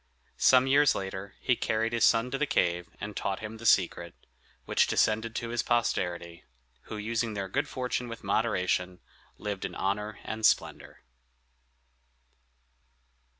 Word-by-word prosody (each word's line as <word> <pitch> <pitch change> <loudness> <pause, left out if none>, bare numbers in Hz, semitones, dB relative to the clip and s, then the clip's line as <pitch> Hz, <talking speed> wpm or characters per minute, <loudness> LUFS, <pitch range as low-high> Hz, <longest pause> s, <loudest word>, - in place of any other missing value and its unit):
Some 130 0 +6
years 140 +1 +4
later 95 0 -5
he 125 - +2
carried 115 0 -1
his 115 - +1
son 115 +2 +3
to 135 - -2
the 150 - +1
cave 85 -5 0
and 105 0 -6
taught 100 -1 -2
him 110 +1 -7
the 115 +1 -3
secret, 85 -3 +2 0.5
which - - +2
descended 110 +1 +1
to 115 - -3
his 120 0 0
posterity, 85 -7 -1 0.5
who, 110 - -5
using 110 +1 -2
their 100 -1 -3
good 95 - -1
fortune 125 -1 -3
with 115 - -8
moderation, 90 -4 0 0.4
lived 100 -2 -4
in - - -4
honor 105 +2 -2
and 110 0 -5
splendor. - - +1
110 Hz, 145 wpm, -29 LUFS, 95-115 Hz, 0.5 s, Some